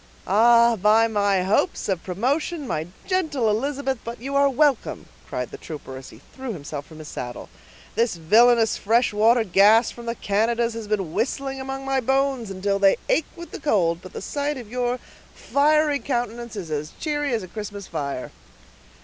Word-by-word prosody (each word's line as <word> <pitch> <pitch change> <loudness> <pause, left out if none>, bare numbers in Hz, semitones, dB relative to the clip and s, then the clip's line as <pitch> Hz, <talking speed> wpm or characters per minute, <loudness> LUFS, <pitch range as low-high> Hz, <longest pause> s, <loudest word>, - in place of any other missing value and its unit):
"Ah! 235 +3 +5
by 215 +3 +4
my 200 -3 +1
hopes 195 +3 +1
of 190 -4 -1
promotion, 280 - -1
my 160 -9 -3 0.2
gentle 315 - 0
Elizabeth, 265 +4 -1
but 235 0 -7
you 275 +4 -5
are 280 0 +5
welcome!" 275 -1 +1 0.2
cried 125 -1 -4
the - - -9
trooper, 145 -4 -8
as 130 0 -9
he - - -15
threw 260 -3 -5
himself 145 -3 -7
from 160 - -13
his 155 -1 -9
saddle. 120 -4 -7 0.4
"This 230 -4 +1
villainous 225 +7 +4
fresh 230 +2 +2
water 225 +3 +4
gas 210 +4 +5
from 235 -1 -11
the 230 - -2
Canadas 230 +3 0
has 225 -2 -6
been 195 -6 -2
whistling 270 +2 -2
among 270 0 -5
my 270 0 +1
bones 265 -3 0
till 200 -1 +1
they 195 -1 +5
ache 315 - +2
with 340 -2 -10
the - - -7
cold, 175 - +1
but 185 - -12
the - - -6
sight 285 +5 -2
of 230 -4 -10
your 245 0 -1 0.4
fiery 295 0 +2
countenance 240 -2 -3
is 180 -6 -6
as 150 +1 -3
cheery 295 -2 -1
as 220 - -3
a - - -8
Christmas 205 0 -7
fire." 140 -6 -4
230 Hz, 180 wpm, -23 LUFS, 195-270 Hz, 0.4 s, Ah